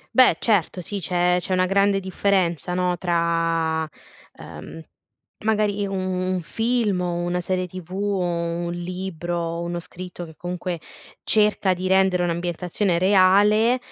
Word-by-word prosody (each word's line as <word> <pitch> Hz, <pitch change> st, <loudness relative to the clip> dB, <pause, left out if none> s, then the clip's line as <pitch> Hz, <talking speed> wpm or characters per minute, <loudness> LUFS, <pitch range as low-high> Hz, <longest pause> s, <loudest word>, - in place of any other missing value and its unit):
Beh, 255 Hz, -1 st, +6 dB
certo 200 Hz, -5 st, +1 dB
sì, 200 Hz, +3 st, -4 dB
c'è 180 Hz, 0 st, +1 dB
c'è 180 Hz, +2 st, -2 dB
una 185 Hz, 0 st, +3 dB
grande 200 Hz, +1 st, +2 dB
differenza, 185 Hz, -3 st, 0 dB
no, 180 Hz, -1 st, +1 dB
tra, 165 Hz, -2 st, +1 dB, 0.5 s
ehm, -, -, -10 dB, 0.7 s
magari 210 Hz, -2 st, +1 dB
u 195 Hz, -, -5 dB
un 185 Hz, -1 st, -1 dB
film 225 Hz, 0 st, 0 dB
o 175 Hz, -1 st, -2 dB
una 175 Hz, +1 st, -1 dB
serie 185 Hz, +1 st, -1 dB
TV 180 Hz, -1 st, -10 dB
o 200 Hz, 0 st, -1 dB
un 170 Hz, 0 st, -2 dB
libro, 175 Hz, -1 st, -4 dB
uno 175 Hz, 0 st, -3 dB
scritto 180 Hz, 0 st, -8 dB
che 160 Hz, -1 st, -12 dB
comunque 180 Hz, 0 st, -4 dB, 0.4 s
cerca 210 Hz, -3 st, +3 dB
di 180 Hz, +1 st, -4 dB
rendere 190 Hz, -1 st, +3 dB
un'ambientazione 175 Hz, +2 st, -1 dB
reale, 205 Hz, +5 st, +4 dB
180 Hz, 135 wpm, -23 LUFS, 175-195 Hz, 0.7 s, Beh